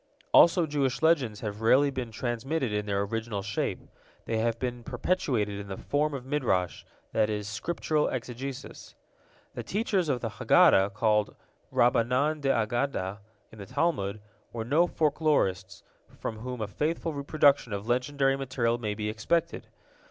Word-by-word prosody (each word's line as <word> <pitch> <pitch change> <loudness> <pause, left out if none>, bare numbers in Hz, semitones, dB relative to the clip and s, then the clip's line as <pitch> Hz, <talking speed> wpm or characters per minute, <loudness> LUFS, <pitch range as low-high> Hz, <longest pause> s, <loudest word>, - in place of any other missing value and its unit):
Also 170 0 +6
Jewish 140 -2 -1
legends 135 -10 +2
have 105 -1 -5
rarely 135 +5 +4
been 130 -3 -4
transmitted 120 +3 -2
in 105 0 -2
their 100 0 0
original 110 -1 -3
shape. 100 +1 -2 0.4
They 115 - -1
have 115 0 0
been 120 -1 -4
perpetuated 115 - -1
in 100 - -7
the 95 -1 -6
form 150 0 -1
of 130 -2 -7
Midrash, 125 - -1 0.3
that 110 -1 +2
is, 105 -1 -3
Scriptural 155 +7 -1
exegesis. 130 +2 -6 0.6
The - - -5
teachers 195 -5 -1
of 125 -4 0
the - - -2
Haggadah, 95 +1 +5
called 105 -1 +1 0.4
Rabbanan 125 +6 +2
d'Aggadta 115 -5 0 0.3
in 110 - -14
the 100 - -8
Talmud, 110 -8 -1 0.3
were 115 -1 -4
no 155 +8 +3
folklorists, 140 - 0 0.4
from 110 - -4
whom 125 0 -5
a 105 - -2
faithful 160 +8 -2
reproduction 140 -3 +2
of 100 0 -4
legendary 135 +2 +1
material 125 -3 -1
may 105 -3 -3
be 105 0 -3
expected. 165 +11 -1
120 Hz, 145 wpm, -28 LUFS, 105-145 Hz, 0.6 s, Also